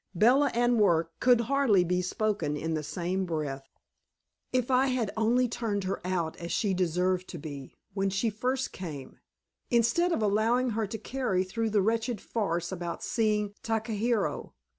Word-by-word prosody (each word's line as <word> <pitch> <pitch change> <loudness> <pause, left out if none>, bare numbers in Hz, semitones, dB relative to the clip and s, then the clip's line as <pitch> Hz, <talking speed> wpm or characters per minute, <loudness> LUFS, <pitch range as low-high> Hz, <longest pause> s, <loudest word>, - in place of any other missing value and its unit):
Bella 255 +9 +5
and 240 -1 +3
work 170 -5 +3
could 245 -2 +5
hardly 235 -6 +3
be 180 +1 0
spoken 200 -4 -1
in 160 +2 -2
the 155 - -1
same 175 +5 -2
breath. 145 -6 -4 0.8
If 255 0 0
I 260 +1 +4
had 250 -5 0
only 235 +3 +2
turned 220 -4 -2
her 190 +1 -3
out 175 -3 -1
as 170 0 -6
she 205 -3 +1
deserved 180 +1 0
to 175 - -6
be, 140 -3 -8 0.2
when 195 0 0
she 195 +4 0
first 255 +5 -1
came, 150 -8 -8 0.5
instead 240 +9 +3
of 225 - 0
allowing 225 +5 +2
her 220 -1 -1
to 225 - -5
carry 240 -8 -1
through 225 +4 -2
the 205 -2 +2
wretched 225 +1 0
farce 175 -7 -2
about 175 -2 -5
seeing 210 -3 0
Takahiro! 225 0 -1
210 Hz, 160 wpm, -29 LUFS, 180-235 Hz, 0.8 s, Bella